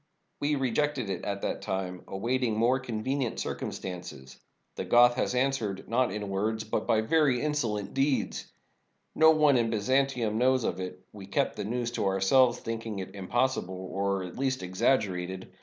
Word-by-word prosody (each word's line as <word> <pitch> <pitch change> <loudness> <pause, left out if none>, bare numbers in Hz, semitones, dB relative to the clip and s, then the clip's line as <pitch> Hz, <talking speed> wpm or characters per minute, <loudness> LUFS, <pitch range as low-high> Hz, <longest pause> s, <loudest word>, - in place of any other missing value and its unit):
We 145 +1 +1
re 130 -4 -1
jected 145 -5 0
it 95 - -3
at 100 -1 -3
that - - -2
time; 90 -1 -3
awaiting 115 +3 -1
more 120 +4 +3
convenient 130 +1 -2
circum - - -3
stances. 85 -8 -8 0.4
The - - -4
Goth 120 0 +6
has 125 - -1
answered, 125 -7 -1
not 125 0 +1
in 105 0 -4
words, 110 +3 -1
but 110 - -2
by 110 - +3
very 135 +1 +3
insolent 120 -9 -1
deeds. 135 0 0 0.6
No 160 0 +6
one 150 -4 +5
in 115 -1 +1
Byzantium 120 0 +1
knows 130 0 +3
of 90 - -2
it 90 0 -7
— - - -44
we 100 -2 -10
kept 100 - 0
the 105 - -4
news 120 +2 -2
to 120 - -1
ourselves, 120 +6 +4
thinking 115 -2 -5
it 95 0 -6
impossi 120 +7 0
ble, 95 +1 -8 0.2
or 100 -1 -1
at 90 +6 -8
least 130 -5 -1
exaggerated. 95 -2 0
115 Hz, 175 wpm, -29 LUFS, 95-130 Hz, 0.6 s, Goth